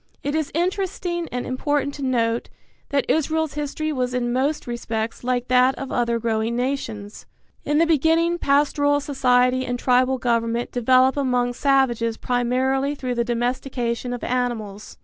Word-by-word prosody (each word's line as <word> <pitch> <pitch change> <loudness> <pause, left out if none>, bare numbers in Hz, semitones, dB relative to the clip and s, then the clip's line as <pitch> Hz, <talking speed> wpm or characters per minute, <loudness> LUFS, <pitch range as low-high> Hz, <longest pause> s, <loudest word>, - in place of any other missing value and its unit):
It 285 - -2
is 315 -2 -1
interesting 355 -1 -2
and 245 0 -3
important 285 +2 -1
to 285 - -8
note 235 -3 0 0.4
that 280 -1 +1
Israel's 315 -1 0
history 300 +1 -3
was 250 -2 -1
in 240 -1 -1
most 280 +4 0
respects 230 -2 -4
like 250 0 -1
that 255 +1 +4
of 270 - -6
other 235 -1 +1
growing 225 0 -1
nations. 230 -5 -4 0.4
In 295 - +1
the 330 - +5
beginning 330 +2 +2
pastoral 290 0 +2
society 255 -2 +2
and 245 -1 -2
tribal 255 +1 +2
government 235 -1 -1
develop 255 +2 +3
among 250 -3 +1
savages 240 -4 +1
primarily 260 +3 0
through 255 -3 -3
the 235 -1 0
domestication 245 0 -2
of 245 - -5
animals. 230 -5 -3
255 Hz, 150 wpm, -22 LUFS, 240-285 Hz, 0.4 s, the